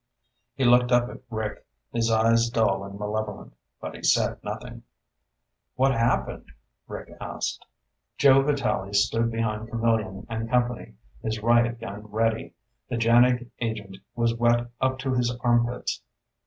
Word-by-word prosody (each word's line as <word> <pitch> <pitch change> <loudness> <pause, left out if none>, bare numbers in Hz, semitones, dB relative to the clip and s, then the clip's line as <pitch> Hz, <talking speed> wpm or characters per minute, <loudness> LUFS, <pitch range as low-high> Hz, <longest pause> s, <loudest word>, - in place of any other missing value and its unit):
He 135 - 0
looked 125 0 +5
up 120 0 +4
at - - -11
Rick, 110 -2 -4 0.3
his 115 -1 +1
eyes 115 +1 +3
dull 110 -5 +1
and 100 0 -8
malevolent, 105 - -4 0.3
but - - -6
he - - -10
said - - +2
nothing. - - -6 0.9
"What 135 +1 +3
happened?" 115 - -1 0.3
Rick - - -8
asked. - - -4 0.5
Joe 135 -1 +6
Vitalli 135 -8 -1
stood 115 +3 +2
behind 115 -1 -2
Camillion 115 -4 0
and 115 0 -4
company, 120 - 0 0.3
his 110 -1 -3
riot 120 0 +3
gun 105 -1 -7
ready. 110 +1 -1 0.3
The 120 - -2
JANIG 120 +1 +4
agent 105 -5 -4 0.2
was 115 -1 +2
wet 120 0 +2
up 130 0 +1
to 130 0 -2
his 120 -1 +1
armpits. 120 0 +1
115 Hz, 140 wpm, -26 LUFS, 110-120 Hz, 0.9 s, Joe